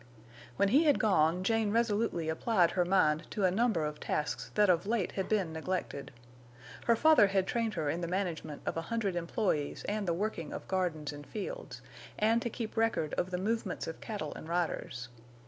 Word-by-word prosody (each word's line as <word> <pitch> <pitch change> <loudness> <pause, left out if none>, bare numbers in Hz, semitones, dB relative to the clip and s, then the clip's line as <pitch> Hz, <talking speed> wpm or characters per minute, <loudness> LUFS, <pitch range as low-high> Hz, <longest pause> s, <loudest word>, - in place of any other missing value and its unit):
When 200 +9 +3
he 285 +9 +5
had 290 -3 +5
gone 180 -4 +3
Jane 225 +1 +2
resolutely 215 -6 +1
applied 175 +2 +2
her 180 - +2
mind 175 -4 +2
to 200 - 0
a 185 - +4
number 205 -5 +2
of 150 0 -4
tasks 150 - -2
that 210 -1 +5
of 180 +1 +2
late 220 -4 0
had 190 - -3
been 195 -7 +1
neglected. 160 -3 -3 0.7
Her 235 - +5
father 300 -4 +6
had 195 -1 +1
trained 230 0 -1
her 160 -4 -1
in 165 +4 -1
the 170 - -2
management 170 -5 -3
of - - -1
a - - 0
hundred 220 -5 -1
employees 170 -3 -1
and 210 -1 -1
the 170 - +2
working 180 -5 -3
of - - -7
gardens 165 -6 -1
and 145 0 -10
fields; - - -6 0.3
and 225 +2 +3
to 235 - -2
keep 225 -1 -5
record 225 -9 +1
of 180 - -1
the 180 - -2
movements 205 0 -2
of 165 - -7
cattle 205 -9 -4
and 160 - -9
riders. 165 -7 -2
190 Hz, 195 wpm, -32 LUFS, 165-220 Hz, 0.7 s, father